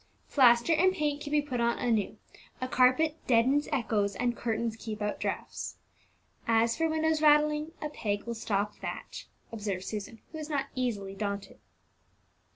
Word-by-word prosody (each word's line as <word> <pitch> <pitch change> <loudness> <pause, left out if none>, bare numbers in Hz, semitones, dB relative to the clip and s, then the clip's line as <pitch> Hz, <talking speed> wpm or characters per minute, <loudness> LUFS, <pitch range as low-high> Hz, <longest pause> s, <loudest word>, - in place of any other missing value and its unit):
"Plaster 245 +2 +5
and 365 +4 +4
paint 295 -1 -1
can 290 - -5
be 295 -1 +3
put 255 -5 -2
on 235 0 +2
anew, 225 -5 0 0.4
a 255 - -2
carpet 260 +5 +3
deadens 260 +5 +3
echoes, 215 -7 0
and 245 -1 0
curtains 230 -1 -2
keep 220 -1 -6
out 210 0 -2
draughts. - - -4 0.7
As 230 0 +3
for 325 0 +1
windows 315 0 +1
rattling, 300 +1 +4
a 300 - -2
peg 205 -8 -2
will 235 - -4
stop 210 -2 -2
that," - - -6 0.3
observed 205 -4 -3
Susan, 215 +2 -6
who 315 - -7
was 305 0 -6
not 285 -3 -1
easily 215 -7 -2
daunted. 200 0 -4
240 Hz, 160 wpm, -30 LUFS, 215-295 Hz, 0.7 s, Plaster